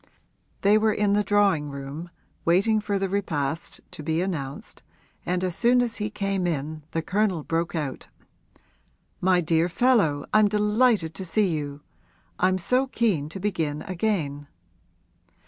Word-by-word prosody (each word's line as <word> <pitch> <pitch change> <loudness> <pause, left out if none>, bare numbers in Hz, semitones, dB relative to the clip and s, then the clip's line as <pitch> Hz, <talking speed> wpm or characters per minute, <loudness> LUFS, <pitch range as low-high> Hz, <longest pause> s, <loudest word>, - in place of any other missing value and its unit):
They 205 +2 +5
were 220 0 +3
in 205 -1 +1
the 210 0 +3
drawing 200 -8 +2
room, 140 +5 -7 0.3
waiting 200 +6 +3
for 205 -1 -1
the 195 0 0
repast 165 -5 -2
to - - -8
be 160 +2 -1
announced, 160 -7 -4 0.5
and 180 +1 0
as 180 -2 -1
soon 245 +1 +4
as 230 -2 -3
he 210 0 -2
came 195 -3 -1
in 155 -1 -3
the 165 0 -2
Colonel 190 -3 0
broke 165 +2 -1
out, 150 -5 -4 1.1
'My 185 -1 +3
dear 165 +1 +2
fellow, 190 - +2
I'm 215 -1 +6
delighted 210 -3 +2
to 190 - -6
see 185 +3 +1
you! 145 -3 -4 0.6
I'm 185 0 +3
so 250 +9 +1
keen 200 - 0
to 180 - -7
begin 160 -7 -2
again.' 170 -7 -2
185 Hz, 145 wpm, -25 LUFS, 155-210 Hz, 1.1 s, I'm